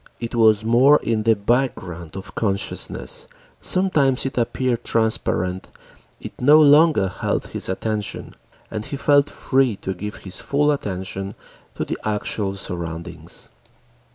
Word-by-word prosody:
It 115 0 -5
was 110 -2 +4
more 130 +6 +6
in 110 -1 0
the 110 +1 +3
background 100 -7 -1
of 95 - -9
consciousness, 100 -3 -3 0.3
sometimes 150 -10 +2
it 135 - -3
appeared 120 0 0
transparent, 95 -5 0 0.5
it - - -8
no 145 +4 +7
longer 150 -6 +6
held 90 - -2
his - - -4
attention, 105 +2 -3 0.4
and 110 -1 -4
he 140 - -5
felt 145 +1 +3
free 130 -4 +1
to 95 0 -4
give 105 +3 -6
his 95 -1 -5
full 145 +1 +1
attention 95 -5 -4 0.4
to - - -2
the - - -4
actual 105 -1 -2
surroundings. 85 -2 -6
110 Hz, 130 wpm, -22 LUFS, 95-135 Hz, 0.5 s, no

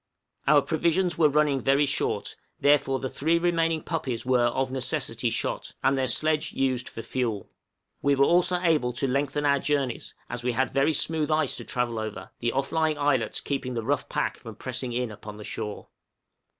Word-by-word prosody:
Our 145 -1 +6
provisions 170 +2 +1
were 155 -2 +6
running 145 -2 +2
very 140 +2 +3
short, 140 - -1 0.2
therefore 140 -2 +3
the 130 - -3
three 160 +6 +1
remaining 165 -2 +1
puppies 125 -3 -3
were 125 -1 +3
of 130 +2 -1
necessity 130 -3 -1
shot, 115 - -3
and 135 +1 +3
their 130 -1 0
sledge 155 +5 +1
used 130 -2 0
for 115 - -7
fuel. 115 -3 -3 0.5
We 140 0 +3
were 140 0 +4
also 180 +2 +3
enabled 155 -9 +1
to 135 - 0
lengthen 140 +2 0
our 140 -1 +4
journeys, 140 -4 -2
as 120 0 -5
we 125 0 -1
had 130 +3 0
very 140 +3 +2
smooth 155 -1 0
ice 155 -3 +1
to - - -6
travel 120 -2 -1
over, 110 -1 -6
the 120 0 0
off 135 +1 -1
lying 160 -1 +1
islets 135 -6 +1
keeping 130 -3 -3
the 115 - -2
rough 145 +5 -1
pack - - -1
from - - -10
pressing 125 - -4
in 120 -1 -2
upon 105 0 -9
the 105 - -9
shore. 105 -1 -5
135 Hz, 190 wpm, -26 LUFS, 125-150 Hz, 0.5 s, Our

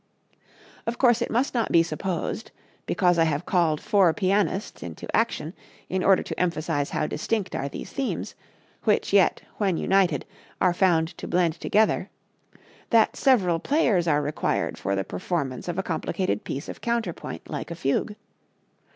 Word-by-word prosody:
Of 230 +1 -2
course, 240 -2 +4
it - - -1
must 245 +5 0
not 235 -3 0
be 165 - +6
supposed, 170 +6 -3 0.4
because 175 -3 +2
I 165 - +5
have 155 +1 -1
called 165 -5 +2
four 195 -5 +4
pianists 195 0 0
into 85 -2 -5
action 185 -8 0 0.4
in 185 0 -1
order 195 -1 +4
to - - -6
emphasize 160 -4 0
how - - -1
distinct 195 +6 -2
are 140 - -2
these - - -8
themes, 275 -2 -3 0.5
which - - +1
yet, - - +4
when 195 -5 +1
united, 185 -8 +2 0.3
are 180 -2 +3
found 170 -3 +2
to - - -6
blend 170 -2 +1
together, 215 +1 +2 0.8
that 225 -1 +4
several 190 -11 +3
players 215 - +2
are 150 -2 +2
required 150 +1 -1
for 100 +1 -2
the 95 - -1
performance 130 - -3
of 175 0 -3
a 190 - 0
complicated 145 - -2
piece 140 +4 -5
of - - -8
counterpoint 235 -1 -3
like - - -5
a 170 - -5
fugue. 165 +6 -1
180 Hz, 160 wpm, -25 LUFS, 155-205 Hz, 0.8 s, be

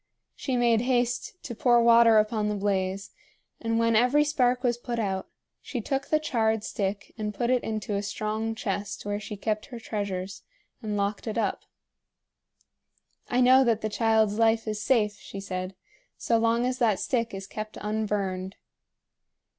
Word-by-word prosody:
She 260 -3 -2
made 235 -2 +3
haste 245 - 0
to 240 - -5
pour 240 +1 +4
water 230 -1 +7
upon 215 0 +1
the 210 - -1
blaze, 195 -1 -1 0.5
and 225 0 -1
when 230 0 +2
every 250 +6 +4
spark 255 -4 +1
was 240 -2 +2
put 240 -1 -4
out, 195 -4 -2 0.3
she 250 - -5
took 270 +4 -2
the 310 - +2
charred 220 -7 0
stick 200 0 -3
and 210 -1 -3
put 240 +4 0
it 250 -1 +2
into 215 -2 -3
a 200 - 0
strong 215 +2 -3
chest 205 -1 -4
where 205 0 -2
she 210 0 -7
kept 215 +1 -2
her 245 -4 -8
treasures, 200 -4 -4 0.4
and 210 -2 -3
locked 200 +2 -2
it 220 - -3
up. 210 -4 -1 1.6
"I 250 +1 +2
know 260 +1 +7
that 230 -3 +1
the 215 - -1
child's 220 -1 +2
life 225 0 +3
is 215 -1 -2
safe," 210 -4 +2
she 195 - -9
said, 185 -1 -5 0.4
"so 230 -1 +1
long 230 +1 +2
as 255 0 -1
that 220 -5 +2
stick 230 -3 -1
is 195 0 -6
kept 215 +2 -7
unburned." 200 -3 -2
220 Hz, 170 wpm, -27 LUFS, 205-240 Hz, 1.6 s, water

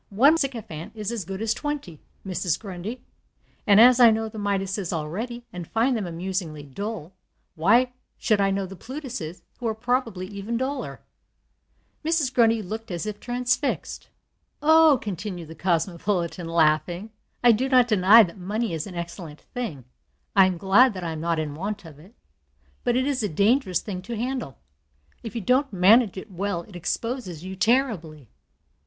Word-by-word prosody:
One 255 +10 +5
MacSycophant 230 - -4
is 215 0 -3
as 225 -7 -4
good 195 +3 -5
as 225 0 +1
twenty, 285 - -5 0.2
Mrs. 180 -3 -1
Grundy; 200 +4 -7 0.6
and 205 0 +7
as 245 +2 +8
I 240 -2 +9
know 220 0 0
the 220 0 -8
Midases 195 -2 -1
already, 210 +10 -4
and 175 -2 -6
find 240 +4 +1
them 210 -5 -2
amusingly 170 -3 -4
dull, 185 +4 -6 0.4
why 235 +10 +3 0.2
should 215 -4 +2
I 195 - +3
know 195 0 -1
the 190 +1 -9
Plutuses, 245 - -7 0.2
who 240 - -2
are 220 - -1
probably 230 -5 -1
even 205 +4 -4
duller?" 265 +3 -4 1.0
Mrs. 310 -5 +1
Grundy 230 -3 +3
looked 220 +4 -6
as 175 +1 -4
if 210 -1 -5
transfixed. 250 +4 -2 0.5
"Oh," 315 -1 +6
continued 185 -5 -5
the - - -8
cosmopolitan, 175 +1 -1
laughing, 170 +5 +1 0.3
"I 240 - +8
do 250 +4 +1
not 250 -2 +5
deny 215 +1 +7
that 180 0 -6
money 210 +3 -2
is 160 +1 -3
an 185 - -9
excellent 170 -2 -7
thing. 215 - -5 0.5
I 195 -2 +7
am 185 -2 -2
glad 200 +6 +4
that 185 - -5
I 165 - -2
am 155 -1 -5
not 170 0 0
in 155 -2 -2
want 200 +4 -5
of 150 -3 -12
it. 190 +10 -17 0.7
But 240 -1 +1
it 260 +1 +2
is 275 -3 0
a 210 - -1
dangerous 200 - +2
thing 185 -4 -5
to 225 +5 -6
handle. 245 - -3 0.6
If 230 0 -8
you 230 - -2
don't 255 +7 +2
manage 200 +3 +5
it 190 - -8
well 185 -1 -2
it 200 - -15
exposes 180 - -3
you 190 +1 -6
terribly. 185 - 0
200 Hz, 170 wpm, -25 LUFS, 175-240 Hz, 1.0 s, I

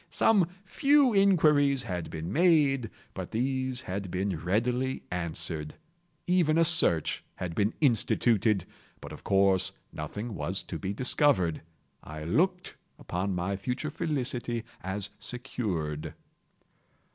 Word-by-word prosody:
Some 200 -6 +3 0.2
few 275 +4 +3
inquiries 150 -9 +4
had 90 -3 -4
been 80 +4 -5
made, 150 -8 +3 0.2
but 95 -2 -6
these 130 +1 -1
had 95 0 -5
been 95 +1 -2
readily 120 +9 -1
answered. 85 -3 -4 0.5
Even 175 -3 +2
a 165 - +5
search 155 - +5
had 90 -2 -5
been 105 +5 0
instituted—but 110 - 0
of - - -11
course 95 -1 +2 0.2
nothing 105 +10 -6
was 95 0 -2
to 85 - -6
be 95 - -3
discovered. 110 - +2 0.4
I 75 0 -8
looked 180 - 0 0.2
upon 95 +2 -3
my 90 +3 -2
future 125 +9 -4
felicity 125 -6 -2 0.2
as 95 +1 -3
secured. 95 - -4
115 Hz, 115 wpm, -28 LUFS, 90-145 Hz, 0.5 s, a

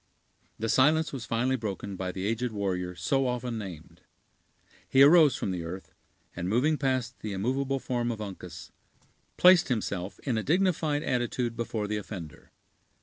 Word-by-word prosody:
The 115 - -2
silence 155 +7 +3
was 125 -4 -5
finally 125 +3 +1
broken 100 -3 -5
by 95 0 -3
the 95 +1 -5
aged 115 +3 -1
warrior 90 -4 -2
so 135 +10 0
often 125 -2 -3
named. 90 -7 -9 0.9
He 135 +1 +6
arose 150 -2 +7
from 100 - -2
the 90 -2 -3
earth, 90 +3 -8 0.4
and 85 +1 -3
moving 130 +9 +2
past 130 -4 -1
the 105 -2 -5
immovable 130 +7 -1
form 120 -2 -2
of 115 - -5
Uncas, 90 -5 -8 0.7
placed 180 -1 +7
himself 100 -6 -2
in 120 -5 -1
a - - -4
dignified 160 -3 +1
attitude 120 -1 -1
before 115 -2 -3
the 105 0 -2
offender. 95 -6 -8
115 Hz, 155 wpm, -28 LUFS, 100-135 Hz, 0.9 s, arose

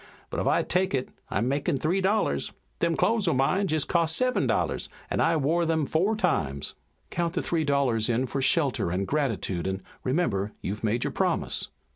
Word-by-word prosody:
But - - -2
if - - 0
I - - +3
take 185 -3 +1
it 130 - -2 0.2
I'm 110 +5 0
makin' 140 +1 0
three 170 +8 +1
dollars. 190 - +1 0.3
Them 170 -1 +1
clothes 225 -4 +2
o' 165 - +3
mine 185 +10 +2
jest 155 -3 +1
cost 165 -2 +2
seven 255 0 +2
dollars - - 0 0.2
an' - - 0
I've 160 -3 +2
wore 165 +3 +2
'em 160 -2 +1
four 185 +10 +1
times." 75 - 0 0.4
"Count 170 0 -1
the 180 - 0
three 165 -2 0
dollars 135 -7 +1
in 120 +2 +1
for 135 +2 -3
shelter 135 - +2
and 95 +3 -1
gratitude 110 - -1
and 95 0 -3 0.2
remember, 115 - 0
you've 105 +3 -4
made 115 +2 +1
your - - -2
promise." - - 0
145 Hz, 190 wpm, -27 LUFS, 115-170 Hz, 0.4 s, I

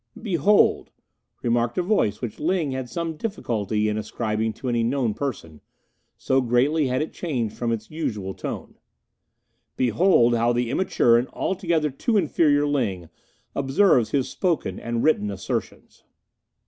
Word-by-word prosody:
"Behold," 200 - +2 0.5
remarked 120 0 0
a 180 - +2
voice 175 - +1
which 120 -4 -5
Ling 165 -3 0
had 130 -2 -4
some 165 -2 -3
difficulty 110 - -2
in 105 0 -1
ascribing 110 0 -2
to 130 - -7
any 120 -1 +1
known 120 -2 0
person, 105 - -5 0.6
so 130 0 +1
greatly 130 +5 +2
had 130 +3 0
it 160 - -8
changed 125 - -3
from 120 -1 -2
its 110 -1 -4
usual 105 -12 -3
tone, - - -7 1.0
"behold 125 - +3
how 120 +1 +2
the 120 0 -1
immature 120 -8 +3
and 125 - -3
altogether 170 -5 0
too 215 - 0
inferior 145 -6 +3
Ling 105 - -1 0.4
observes 135 - +3
his 135 -3 0
spoken 165 - -1
and 115 0 -2
written 105 -10 +2
assertions!" 100 -1 -5
125 Hz, 140 wpm, -24 LUFS, 115-155 Hz, 1.0 s, behold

